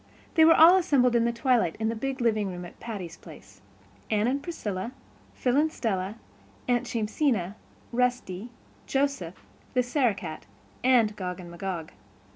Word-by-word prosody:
They 320 - +6
were 325 - +7
all 340 +4 +8
assembled 270 -9 +3
at 235 0 +2
twilight 235 -8 +2
in 220 - 0
the 230 - -2
big 265 +3 -3
living 215 -3 +1
room 180 -1 -6
at 175 - -13
Patty's 195 -8 -6
Place—Anne 100 - -6
and 270 +4 0
Priscilla, 230 - -4 0.4
Phil 250 -1 +1
and 310 +2 +3
Stella, 200 -6 -2 0.5
Aunt 245 -1 +1
Jamesina, 215 - 0 0.4
Rusty, 245 -4 -1 0.4
Joseph, 270 -11 -1 0.3
the 250 - +4
Sarah 245 -3 +1
Cat, 160 -4 -8 0.4
and 235 -5 +4
Gog 180 -2 -5
and 175 -1 -9
Magog. 170 -2 -5
225 Hz, 145 wpm, -27 LUFS, 185-255 Hz, 0.5 s, all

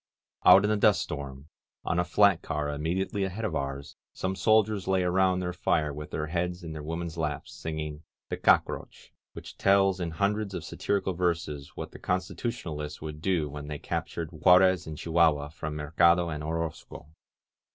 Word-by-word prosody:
• - - +3
• - - +12
• - - +10
Out 95 - +5
in 105 - +2
the 105 - +2
dust 105 -1 +4
storm, 70 -2 -6 0.4
on 85 - 0
a - - +3
flat 95 +1 +4
car 75 -2 -2
immediately 85 +7 -1
ahead 95 +4 -3
of 100 - -2
ours, 70 0 -4 0.2
some 95 +1 -2
soldiers 110 -2 +2
lay 95 -1 +2
around 90 0 +2
their 90 0 -3
fire 80 -4 0
with 75 +1 -7
their 75 - -3
heads 90 +3 -2
in 80 - -6
their 75 - -6
women's 85 +2 -5
laps, 75 -3 -3
singing 75 -1 -5 0.3
^^The - - -4
Cock - - +5
roach," - - -9 0.2
which - - -10
tells 95 -1 +4
in 85 -2 -2
hundreds 100 +4 -1
of - - -4
satirical 100 -2 -1
verses 80 -5 -2
what - - -6
the - - -12
Constitutionalists 90 -5 -3
would 75 -1 -7
do 85 -4 +1
when 75 0 -7
they 75 -1 -4
captured 80 +2 -4
Juarez 90 +2 +4
and 80 -1 -6
Chihuahua 80 -3 +2
from 75 0 -6
Mercado 85 +3 +3
and 75 -1 -4
Orozco. 80 -2 -5
85 Hz, 185 wpm, -28 LUFS, 75-95 Hz, 0.4 s, •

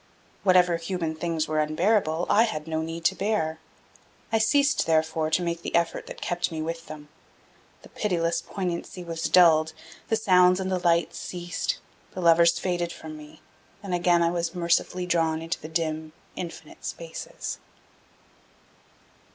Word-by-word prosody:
Whatever 180 -3 +4
human 165 -1 -3
things 160 -1 -2
were 155 0 0
unbearable, 160 +2 +1
I 215 - +5
had 155 -8 -4
no 160 0 -1
need 165 +1 -6
to - - +4
bear. 190 -7 -1 0.7
I 225 - +3
ceased, 280 +6 +3
therefore, 160 0 +1
to 180 - +1
make 170 -1 -2
the - - -4
effort 170 -1 0
that - - -9
kept 175 0 -1
me 160 - -4
with 165 +1 -4
them. 150 -1 -10 0.7
The - - -14
pitiless 170 -5 0
poignancy 180 -1 -4
was 165 -1 -4
dulled, 160 -3 +5 0.4
the 225 - +3
sounds 180 -3 +4
and 190 0 -2
the 185 - +1
light 170 -1 +2
ceased, 175 - -3 0.4
the - - -4
lovers 170 0 +5
faded 175 -2 -1
from 155 -2 -9
me, 150 0 -13 0.4
and 195 -2 -4
again 175 -1 +3
I 170 - +2
was 170 0 -2
mercifully 175 +1 +1
drawn 165 -2 +1
into 165 +1 -4
the 155 - -8
dim, 155 -1 -2 0.2
infinite 170 -2 -8
spaces. - - -6
170 Hz, 155 wpm, -26 LUFS, 160-180 Hz, 0.7 s, I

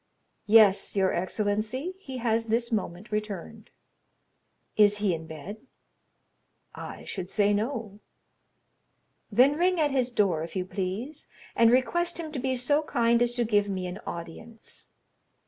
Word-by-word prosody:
"Yes, 210 -3 +5
your 190 -1 +2
excellency; 215 - -2
he 265 -9 -7
has 230 -1 0
this 235 +2 0
moment 200 -2 -3
returned." 210 0 -5 1.1
"Is 205 -1 +5
he 205 -3 +1
in 160 -1 -6
bed?" 160 +6 -8 1.2
"I - - -8
should 185 -2 -5
say 205 0 +2
no." 215 -2 -3 1.3
"Then 255 +7 +5
ring 360 +1 +2
at 295 -2 +2
his 255 -2 +1
door, 195 -9 +1
if 165 - -8
you 185 -1 -1
please, 195 +11 -5 0.3
and 230 -1 +5
request 345 +8 +1
him 325 -2 -6
to 290 - -4
be 260 +1 -1
so 290 +5 +2
kind 235 -5 +1
as 240 0 +1
to 240 - +1
give 205 -2 +2
me 185 -2 -3
an 180 +3 -6
audience." 195 +7 -9
220 Hz, 145 wpm, -27 LUFS, 195-250 Hz, 1.3 s, Yes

